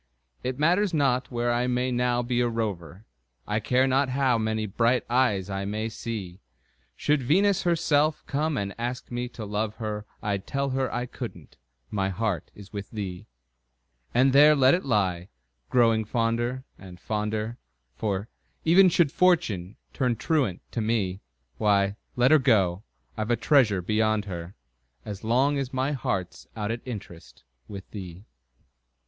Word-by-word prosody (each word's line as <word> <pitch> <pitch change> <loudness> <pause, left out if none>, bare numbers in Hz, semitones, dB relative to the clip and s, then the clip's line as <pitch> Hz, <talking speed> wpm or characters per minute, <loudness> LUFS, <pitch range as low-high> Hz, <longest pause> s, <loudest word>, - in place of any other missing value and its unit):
It 130 0 -3
matters 175 +5 +2
not 130 -3 +1
where 120 0 0
I 120 +1 +1
may 125 +1 0
now 125 0 +1
be 120 0 0
a 120 - +2
rover, 105 -4 -4 0.4
I 105 +1 0
care 125 +4 +2
not 135 +1 +2
how 130 -2 +2
many 110 0 -1
bright 115 +5 +1
eyes 120 -7 +2
I 95 -1 -3
may 110 +2 -2
see; 105 -5 -6 0.6
Should 150 -1 +1
Venus 190 +9 +3
herself 155 -3 +2
come 150 +1 -1
and 100 -2 -2
ask 120 +1 -4
me 120 0 -3
to 120 -3 -8
love 105 +1 -2
her, 105 -1 -5 0.2
I'd 100 -2 -2
tell 140 0 -1
her 130 0 -1
I 120 0 -2
couldn't - - -8 0.4
my 95 -2 0
heart 95 -4 -2
is 100 0 -13
with 100 -1 -6
thee. 95 -5 -6 0.8
And 130 +2 +3
there 150 +2 +7
let 135 -1 +5
it 180 - +1
lie, 95 -7 0 0.4
growing 115 -2 +3
fonder 120 +3 -1 0.2
and, 90 -2 -12
fonder 110 +3 -3 0.4
For, 100 - -2 0.4
even 180 +3 +7
should 165 -4 +3
Fortune 135 - +2 0.2
turn 125 -3 +1
truant 125 - 0
to 115 - -2
me, 105 -4 -1 0.4
Why, 100 -1 +2 0.2
let 125 +2 +4
her 155 - +7
go 100 -9 +2 0.3
I've 110 0 -3
a 120 - +4
treasure 115 - +3
beyond 110 +1 +1
her, 90 -1 -7 0.5
As 100 0 -7
long 135 +6 +2
as 135 -2 -3
my 130 +2 0
heart's 95 - -3
out 105 0 -2
at 115 0 -4
interest 100 -9 -9 0.2
With 100 -2 -8
thee! 95 -1 -8
115 Hz, 155 wpm, -26 LUFS, 105-130 Hz, 0.8 s, there